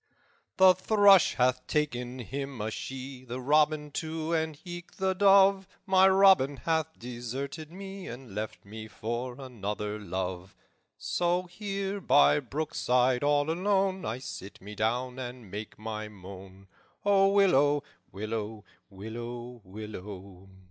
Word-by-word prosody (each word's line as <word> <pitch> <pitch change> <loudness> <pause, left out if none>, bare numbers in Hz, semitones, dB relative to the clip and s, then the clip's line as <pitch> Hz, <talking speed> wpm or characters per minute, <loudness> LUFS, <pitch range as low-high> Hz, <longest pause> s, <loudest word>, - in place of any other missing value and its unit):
"'The 190 -1 +8
thrush 200 0 +5
hath 125 0 +1
taken 125 -5 -1
him 135 +1 -5
a 110 +1 -2
she, 130 +2 -7
The 125 0 -6
robin, 150 +2 +2
too, 160 +1 -3
and 160 -2 -1
eke 175 0 -8
the 190 -1 0
dove; 195 0 +5 0.2
My 190 0 +5
Robin 190 -8 +5
hath 160 0 -1
deserted 130 +6 -6
me, 195 +1 -8
And 120 -3 -9
left 105 0 -5
me 110 +2 -8
for 120 +4 -5
another 105 -4 -4
love. 95 -1 -5 0.4
So 175 +1 0
here, 195 +1 -4
by 145 -2 +5
brookside, 125 -2 0
all 145 +1 +2
alone, 190 +1 +1
I 110 +2 -3
sit 100 -6 -8
me 105 +2 -10
down 125 +4 -1
and 125 -5 -8
make 105 +1 -7
my 110 0 -5
moan. 95 -1 -12 0.4
O 195 -1 +5
willow, 145 -8 +4 0.3
willow, 110 +1 -4 0.3
willow, 120 +4 -7
willow! 95 -2 -9
130 Hz, 130 wpm, -29 LUFS, 110-175 Hz, 0.4 s, The